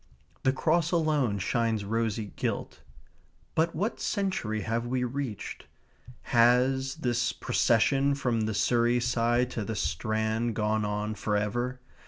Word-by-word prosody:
The 130 - +3
cross 160 +4 +1
alone 150 - +1
shines 110 +1 0
rosy 110 -1 -2
gilt. - - -3 0.7
But 165 +1 +1
what 205 +8 -1
century 185 - -1
have 115 +2 -2
we 125 +1 0
reached? 125 -4 -5 0.7
Has 125 +3 +4
this 120 -5 0
procession 135 +3 +2
from 125 -5 0
the 110 - -2
Surrey 120 +2 +2
side 120 +1 +1
to 110 - -3
the 110 +2 -4
Strand 110 +2 -1
gone 110 0 0
on 105 +1 -2
for 105 -1 -1
ever? 120 +5 -2
120 Hz, 130 wpm, -28 LUFS, 110-130 Hz, 0.7 s, Has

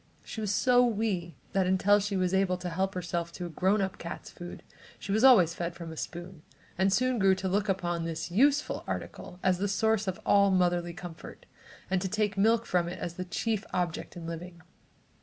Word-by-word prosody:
She 220 - -6
was 210 -2 -1
so 245 +4 +4
wee 205 -7 -1 0.2
that 190 -2 +2
until 190 +2 +4
she 200 -1 -2
was 185 0 0
able 190 -1 +2
to 180 0 -5
help 190 +3 -1
herself 170 -1 -3
to 180 - -5
a - - -5
grown 190 +5 +1
up 190 -1 -4
cat's 170 -1 -7
food, 175 0 -9 0.3
she 195 - -6
was 215 +4 +2
always 195 -11 +7
fed 170 0 -4
from 170 -2 -7
a - - -8
spoon, 175 +1 -7 0.3
and 190 +2 +2
soon 255 +4 +2
grew 195 -1 +4
to 190 0 -3
look 200 +2 0
upon 175 -3 -1
this 165 +1 -4
useful 280 +9 +2
article 180 - -6
as 185 -1 +2
the 205 - 0
source 220 +1 +1
of 190 - -2
all 200 0 +5
motherly 175 -2 +1
comfort, 175 -2 -10 0.4
and 190 -1 0
to 190 - -1
take 210 0 0
milk 225 +3 +3
from 175 -2 +1
it 180 - -6
as 175 - -5
the 185 +1 -5
chief 215 +3 -2
object 175 -1 -2
in 170 - -7
living. 170 +1 -7
185 Hz, 210 wpm, -29 LUFS, 175-205 Hz, 0.4 s, always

